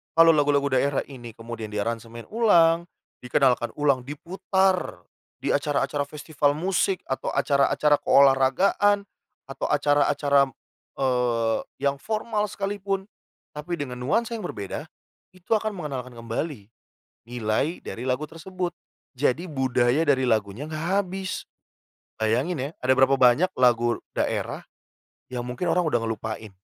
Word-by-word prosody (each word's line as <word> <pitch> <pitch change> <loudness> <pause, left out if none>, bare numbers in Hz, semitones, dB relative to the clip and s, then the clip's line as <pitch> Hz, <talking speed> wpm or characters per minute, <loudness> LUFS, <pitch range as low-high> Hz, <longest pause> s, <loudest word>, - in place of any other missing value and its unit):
Kalau 165 0 +8
lagu-lagu 145 -1 +2
daerah 140 +1 +1
ini 120 -4 -9
kemudian 115 -1 -8
diaransemen 115 +2 -4
ulang, 170 -7 +4 0.4
dikenalkan 125 -2 +2
ulang, 140 -4 +2
diputar 185 +6 -1 0.4
di - - -1
acara-acara 145 0 0
festival 145 0 -1
musik, 185 +2 0
atau 130 - -2
acara-acara 140 +1 +3
keolahragaan, 140 +10 +4 0.4
atau 135 - -5
acara-acara, 145 -1 +3 0.5
eee, 120 -4 +1 0.2
yang 140 0 +1
formal 215 +4 -2
sekalipun 195 0 -3 0.5
tapi 160 +3 -4
dengan 130 -3 -4
nuansa 225 - 0
yang 215 - -6
berbeda, 100 - -5 0.5
itu 185 -1 -22
akan 215 0 -1
mengenalkan 140 -9 -5
kembali 115 0 -5 0.6
nilai 120 +7 -1
dari 120 - -7
lagu 130 +3 -1
tersebut, 180 +2 -5 0.4
jadi 145 +6 0
budaya 130 +1 +2
dari 130 -2 +3
lagunya 110 +1 0
enggak 160 +5 0
habis. 190 0 -5 0.7
Bayangin 125 +11 0
ya, 135 +2 -3
ada 130 +1 +3
berapa 135 +1 +5
banyak 130 +9 +5
lagu 120 -1 +3 0.2
daerah - - -2 0.7
yang 125 -1 -3
mungkin 125 +8 -4
orang 180 - +3
udah 120 -6 +2
ngelupain 110 -2 -4
140 Hz, 120 wpm, -25 LUFS, 125-170 Hz, 0.7 s, Kalau